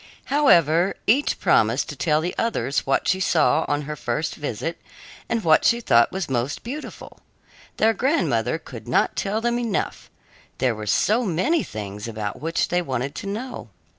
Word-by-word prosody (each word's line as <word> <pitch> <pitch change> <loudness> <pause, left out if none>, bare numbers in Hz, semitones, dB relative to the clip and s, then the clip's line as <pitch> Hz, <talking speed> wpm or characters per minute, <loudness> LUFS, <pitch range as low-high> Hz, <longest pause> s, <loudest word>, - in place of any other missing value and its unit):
However, 175 - +4
each 270 +7 +2
promised - - +2
to - - -6
tell 155 -2 +1
the 175 +2 -2
others 220 -14 -1
what 135 - +1
she 185 - +2
saw 160 -4 +2
on 145 0 -1
her 150 +1 -5
first 140 +3 -2
visit 150 +3 -4 0.5
and 230 -2 -1
what 155 -1 +4
she 235 - +3
thought 115 - +4
was 190 -2 -3
most 130 +2 -2
beautiful. 280 +6 -8 0.6
Their 220 +1 +3
grandmother 270 +10 +1
could - - -11
not - - +1
tell 210 +3 -1
them 240 +1 0
enough 230 -5 -3 0.5
there 125 -2 +1
were 105 -1 -7
so 220 - +2
many 225 - +1
things 105 0 -6
about 110 -2 -5
which 165 +2 -1
they 175 0 +1
wanted 135 -3 -3
to 200 - -7
know. 225 - -5
170 Hz, 165 wpm, -23 LUFS, -, 0.6 s, However